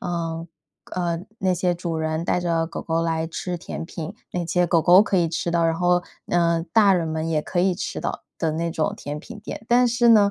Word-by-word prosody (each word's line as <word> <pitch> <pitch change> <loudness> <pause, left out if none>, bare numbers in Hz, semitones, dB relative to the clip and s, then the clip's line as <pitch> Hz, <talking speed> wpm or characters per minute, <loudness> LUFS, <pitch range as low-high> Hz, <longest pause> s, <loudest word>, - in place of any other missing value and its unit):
呃， 165 -1 -3 0.5
呃， 170 -2 -1 0.2
那 190 -1 +1
些 180 0 +1
主 170 -2 -3
人 160 +1 -1
带 180 - +1
着 165 -2 0
狗 170 - -6
狗 165 0 -1
来 165 -1 0
吃 175 +2 -4
甜 170 - -6
品， 165 -2 -6 0.2
那 175 -2 -3
些 180 +1 +2
狗 165 -1 +4
狗 180 +4 +7
可 200 - 0
以 170 -2 +3
吃 170 +1 -2
到， 170 -1 +2
然 165 - +1
后， 175 +1 +3 0.3
呃， 170 -1 +2
大 205 -3 +6
人 170 -3 0
们 160 0 -2
也 155 -2 +1
可 175 - -3
以 185 +1 +3
吃 - - -4
到 - - -3 0.2
的 160 -2 0
那 165 +1 -1
种 160 -1 -1
甜 145 +1 -5
品 210 - -10
店。 220 +1 -8
但 245 +1 +5
是 240 0 +3
呢， 205 -3 +6
170 Hz, 245 characters per minute, -23 LUFS, 165-180 Hz, 0.5 s, 狗